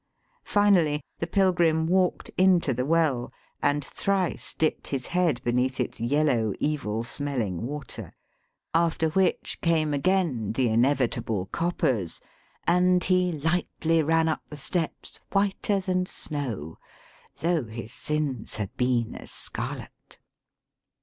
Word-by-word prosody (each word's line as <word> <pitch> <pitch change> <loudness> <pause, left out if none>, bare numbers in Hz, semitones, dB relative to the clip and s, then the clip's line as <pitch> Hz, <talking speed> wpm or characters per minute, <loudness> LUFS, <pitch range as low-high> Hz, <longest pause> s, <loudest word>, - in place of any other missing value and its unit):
Fin 205 -1 +4
ally, 150 -3 +1 0.2
the 165 - -2
pilgrim 175 -5 +3
walked 180 +1 +1
into 180 -7 +4
the 125 +2 -2
well, 155 -7 +2 0.3
and 145 0 +1
thrice 195 -3 -1
dipped 155 - 0
his 130 -3 -2
head 170 -7 +1
beneath 125 +2 0
its 125 - -2
yellow, 120 -4 +2
evil 130 -7 -1
smelling 120 - -1
water; 145 -3 -6 0.6
after 165 -1 +2
which 190 +3 0
came 160 -5 +2
again 145 - +1
the 125 0 +2
inevitable 115 -4 +1
coppers, 130 - 0 0.5
and 180 +1 +4
he 180 -1 +2
lightly 165 +1 +1
ran 160 +1 +2
up 160 - 0
the 150 - -9
steps 160 +3 -3
whiter 200 0 +1
than 185 -1 0
snow, 120 - -5 0.6
though 165 -5 +1
his 110 0 -8
sins 150 -6 -2
had 105 -3 -4
been 125 -2 +1
as - - -9
scarlet. - - -6
150 Hz, 125 wpm, -26 LUFS, 125-175 Hz, 0.6 s, Fin